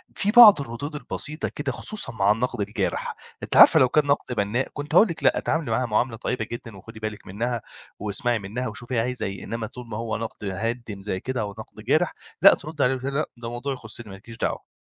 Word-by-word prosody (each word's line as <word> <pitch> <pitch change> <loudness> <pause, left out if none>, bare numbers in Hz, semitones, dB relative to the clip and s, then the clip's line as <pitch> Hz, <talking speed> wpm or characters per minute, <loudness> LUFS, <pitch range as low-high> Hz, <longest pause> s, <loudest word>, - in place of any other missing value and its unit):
في 205 - +1
بعض 215 -9 +9
الردود 140 +4 -6
البسيطة 150 +1 -3
كده 145 -2 -2
خصوصًا 205 - -3
مع 100 -2 +3
النَقْد 115 0 -1
الجارح. 105 +1 -2 0.3
أنتِ - - 0
عارفة - - +9
لو 130 - +5
كان 150 +3 +3
نَقْد 140 -3 0
بَنّاء 105 +6 0
كنت 145 +3 -4
هاقول 220 - +8
لِك: 170 - -5
لأ، - - +4
تعاملي 155 -7 -1
معاها 125 +3 +1
معاملة 115 +2 0
طيبة 125 +2 -2
جدًا، 115 -3 -7
وخُدي 110 +3 -12
بالِك 110 -1 -6
منّها 115 +4 -2 0.4
واسمعي 110 +3 0
منّها 110 +6 -4
وشوفي 120 +3 -5
هي - - +3
عايزة 125 +2 -1
إيه، 95 -1 -5
إنّما 115 -1 -4
طول 125 +2 -10
ما 105 - -5
هو 115 -1 -2
نَقْد 115 -1 -6
هادم 110 0 -4
زي 95 -2 -3
كده 130 +3 -3
أو 105 -1 -3
نَقْد - - -11
جارح، - - +2 0.3
لأ، - - +9
تردي 150 -1 -3
عليه 130 +1 +3
وتقولي 135 +2 -4
لها 150 - +2
لأ، - - -33
ده 115 0 -6
موضوع 125 +3 -3
يخُصّني 110 -2 -7
مالكيش 110 +4 -11
دعوة. - - -3
120 Hz, 220 wpm, -24 LUFS, 110-135 Hz, 0.4 s, بعض